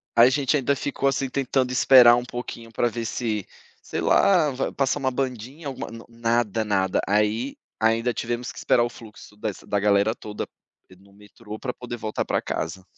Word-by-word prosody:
a 115 +1 +8
gente 140 +2 +1
ainda 140 +1 +1
ficou, 140 0 -2
assim, 135 -1 -1
tentando 130 -1 0
esperar 125 -2 +7
um 120 0 -2
pouquinho 120 -2 -7
pra 120 - +1
ver 115 +1 -4
se, 110 -3 -2 0.4
sei - - -4
lá, 180 -6 +4
va 135 0 -2
passa 135 0 0
uma 130 -1 0
bandinha, 130 +3 -4
alguma, 135 - -5
não 115 0 -10
nada, 115 -2 0
nada, 95 -3 +1
aí 105 +6 +1 0.2
ainda 115 +2 +2
tivemos 120 +1 -3
que - - -16
esperar 120 - +3
o 120 - -1
fluxo 105 -3 -14
dessa 105 -2 -5
da 100 - +1
galera 100 +2 +3
toda, 105 -3 -6 0.4
eh, 95 - -16
no 100 +1 -22
metrô 105 +1 -11
pra 125 - -4
poder 120 -1 -7
voltar 110 -1 -3
pra - - 0
casa. 85 +4 -4
120 Hz, 190 wpm, -24 LUFS, 105-130 Hz, 0.4 s, a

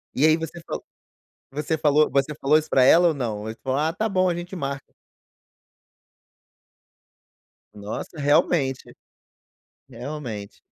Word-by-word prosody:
E 140 - +3
aí 155 +1 +5
você 165 +1 -7
falou - - -5 0.7
você 150 +3 -2
falou 150 0 +3
você 140 +2 +1
falou 150 +2 +3
isso 155 0 -3
pra 130 - +4
ela 170 +6 +6
ou - - 0
não? 115 -7 -3
Ou - - -7
você 110 +1 -6
falou: 135 +1 0
"Ah, 160 +2 0
tá 220 +4 -1
bom, 185 -1 +2
a 170 - -1
gente 175 +2 -6
marca." 140 -4 -5 2.8
Nossa, 105 +9 -7
realmente, 140 -1 +1 0.9
realmente. 120 -5 -7
145 Hz, 140 wpm, -24 LUFS, 130-160 Hz, 2.8 s, ela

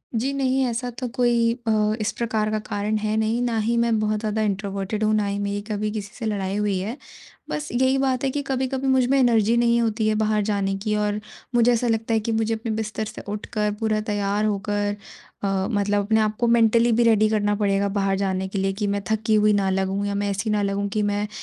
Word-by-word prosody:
जी 260 +5 0
नहीं, 265 -1 +1
ऐसा 245 +1 -2
तो 250 - -2
कोई 235 -2 +3 0.2
अ, 215 -1 +2
इस 215 - 0
प्रकार 220 -2 0
का 215 - 0
कारण 205 +1 -1
है 215 0 -1
नहीं, 220 +2 +1
ना 235 -2 0
ही 230 +2 0
मैं 235 -2 +2
बहुत 215 0 0
ज़्यादा 215 0 -1
इंट्रोवर्टेड 200 +1 -2
हूँ 215 0 +2
ना 210 - +1
ही 200 0 -2
मेरी 205 0 -2
कभी 210 0 -1
किसी 210 0 -6
से 235 - -6
लड़ाई 200 -2 -2
हुई 205 -2 0
है। 220 +8 -4 0.5
बस 300 0 -3
यही 260 +2 +2
बात 265 -1 0
है 270 - +2
कि 290 - -2
कभी-कभी 265 0 -1
मुझ 260 -1 +3
में 275 - +3
एनर्जी 230 -2 +3
नहीं 235 0 +3
होती 220 -1 0
है 215 - +2
बाहर 215 -1 +1
जाने 200 -2 0
की 210 +1 -1
और 210 0 0 0.4
मुझे 240 +1 +5
ऐसा 235 +1 0
लगता 225 0 0
है 220 - +3
कि 225 +2 -3
मुझे 225 0 0
अपने 225 0 -3
बिस्तर 220 0 -3
से - - -8
उठकर 210 0 -2
पूरा 215 -1 0
तैयार 205 +1 0
होकर 205 0 -1 0.5
अ, 195 0 0
मतलब 205 0 +1
अपने 220 +1 +2
आप 215 0 +1
को 240 - +2
मेंटली 230 0 +4
भी 235 +2 +3
रेडी 215 -2 +4
करना 205 -1 +1
पड़ेगा 200 -1 +1
बाहर 195 0 +1
जाने 190 -1 -1
के 195 +1 -5
लिए 195 0 0
कि 205 - +1
मैं 200 0 -1
थकी 220 0 +1
हुई 210 0 +4
ना 195 -2 +1
लगूँ 195 +1 -1
या 200 - -2
मैं 205 0 -1
ऐसी 200 +3 -2
ना 210 -1 +1
लगूँ 200 0 -1
कि 215 - +1
मैं, 205 0 0
215 Hz, 235 wpm, -23 LUFS, 205-230 Hz, 0.5 s, मुझे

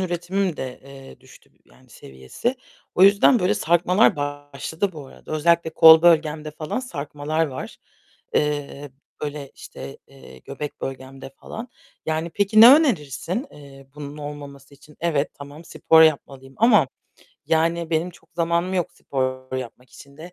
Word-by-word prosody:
üretimim 180 0 -2
de, 130 -1 -7
eee, 135 -1 -14
düştü 130 - -19
yani, - - -24
seviyesi. 65 - -5 0.4
O 180 - +3
yüzden 200 +6 +6
böyle 190 +1 +1
sarkmalar 180 +2 +2
başladı 145 +5 -4
bu 150 -4 -10
arada. - - -12
Özellikle 170 +2 +2
kol 160 0 +8
bölgemde 155 -2 +2
falan 155 - -5
sarkmalar 150 - -3
var. 130 -3 -8 0.6
Eee, 145 -1 -2 0.3
böyle, 145 -2 -5
işte, 70 +1 -11
eee, 65 0 -16
göbek 145 - -8
bölgemde 135 0 -8
falan. 225 - -10 0.4
Yani, 160 +1 -2
peki 200 +5 +2
ne 240 +4 +11
önerirsin, 190 - -1
eee, 135 -2 -15
bunun 145 0 -9
olmaması 145 -2 -10
için? 145 +2 -20
Evet, 150 -4 0
tamam, 145 +3 -12
spor 160 0 +4
yapmalıyım 135 -4 0
ama 230 +2 +4 0.6
yani 165 +1 0
benim 165 +2 0
çok 175 - -21
zamanım 170 +2 -1
yok 175 -4 -2
spor 130 -1 -4
yapmak 125 0 -9
için 140 0 -16
de. 170 +3 -11
150 Hz, 140 wpm, -22 LUFS, 140-170 Hz, 0.6 s, ne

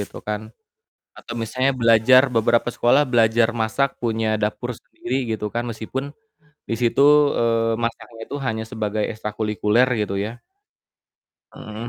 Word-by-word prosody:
gitu 100 - -7
kan 105 +1 -4 0.7
atau 115 - -9
misalnya 130 +4 0
belajar 115 +3 +6
beberapa 115 +1 +2
sekolah 125 +5 +3
belajar 115 -2 +3
masak 125 +5 +1
punya 115 -1 -1
dapur 110 +4 -2
sendiri 120 +3 -7 0.2
gitu 110 -1 -3
kan 120 +1 -1
meskipun 115 +5 -5 0.7
disitu, 115 0 -1 0.4
eee, 115 -1 +1
masaknya 115 0 -5
itu 140 - -5
hanya 110 -1 -2
sebagai 110 -1 -2
ekstrakulikuler 105 +2 0 0.2
gitu 100 -1 -3
ya. 110 +5 -5 1.1
Heeh 110 +2 -8
115 Hz, 125 wpm, -22 LUFS, 110-120 Hz, 1.1 s, belajar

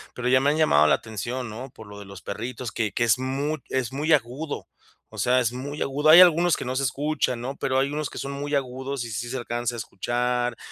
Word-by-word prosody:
pero 125 0 -3
ya 130 +1 +5
me 140 - +3
han 150 - +1
llamado 75 - +5
la - - +5
atención, 120 +4 -5
¿no?, 125 +5 -7
por 110 -2 -13
lo 105 -1 -11
de 100 - -10
los 100 -1 -11
perritos, 120 +3 -5
que 110 -3 -1
que - - 0
es 120 +1 +3
muy 140 +4 -2
es 130 -1 -2
muy 150 +4 +1
agudo, 145 +3 -1 0.4
o - - -10
sea, 125 +1 +3
es 120 -2 0
muy 140 +4 -6
agudo, 145 +3 +1
hay 165 +3 +11
algunos 175 -1 +5
que - - -5
no 125 +1 -3
se 135 - 0
escuchan, 135 -1 -1
¿no?, 130 +4 -5
pero 130 0 0
hay 135 +1 +1
unos 150 -1 -2
que - - -10
son 140 - -4
muy 145 +1 -3
agudos 130 -1 -3
y 115 - -7
sí 115 +3 -4
se 130 - -3
alcanza 120 0 -3
a - - -6
escuchar, 120 +3 -1
130 Hz, 250 wpm, -25 LUFS, 120-140 Hz, 0.4 s, hay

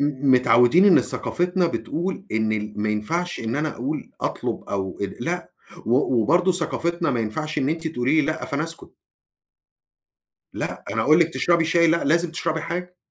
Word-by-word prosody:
م 140 -1 0
متعوّدين 125 - +5
إن 195 -4 +7
ثقافتنا 180 0 0
بتقول 185 +3 -3
إن 110 0 +1
ال 105 0 -3
ما 105 - 0
ينفَعش 165 +13 -2
إن 115 +2 -2
أنا 155 +1 0
أقول 140 +6 -4
أطلُب - - -3
أو 95 -2 -3
ال 100 -1 -4
لأ 175 +1 -3 0.4
و 125 0 +2
وبرضه 175 - +3
ثقافتنا 170 -1 -1
ما 125 -3 0
ينفَعش 155 +8 -3
إن 135 - 0
أنتِ 165 +1 -2
تقولي 145 +1 +1
لي - - +1
لأ 155 0 -2
فأنا 140 +1 -1
أسكُت. 165 0 -11 1.6
لأ، - - -5
أنا - - 0
أقول 155 +3 +5
لِك 165 - +4
تشرَبي 170 -1 +2
شاي، 170 +1 +3
لأ، 170 +1 +2
لازم 170 +3 +2
تشرَبي 160 0 -2
حاجة، 180 +2 -5
155 Hz, 175 wpm, -23 LUFS, 125-170 Hz, 1.6 s, إن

